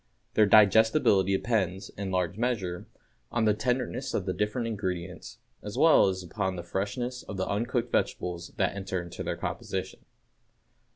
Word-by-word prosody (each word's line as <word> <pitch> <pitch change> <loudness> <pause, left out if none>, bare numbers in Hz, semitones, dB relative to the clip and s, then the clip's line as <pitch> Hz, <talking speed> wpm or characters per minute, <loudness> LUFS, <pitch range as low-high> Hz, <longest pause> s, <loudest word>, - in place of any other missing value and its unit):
Their 105 -1 +5
digestibility 105 -1 +5
depends, 95 -5 -1
in 100 -1 -5
large 90 -1 0
measure, 105 -7 -2 0.4
on 120 -2 +1
the 105 - +4
tenderness 125 +3 -2
of 95 - -1
the 95 - -1
different 105 +4 -1
ingredients, 95 -5 -4 0.2
as 105 +3 -7
well 160 -6 +6
as 95 -1 -2
upon 95 +2 -2
the 85 - -5
freshness 110 +8 -3
of 100 - -8
the 95 - -1
uncooked 120 +3 -1
vegetables 90 0 -1
that 95 -1 +1
enter 95 -2 -3
into 85 -1 -7
their - - -3
composition. - - -4
100 Hz, 155 wpm, -28 LUFS, 95-115 Hz, 0.4 s, well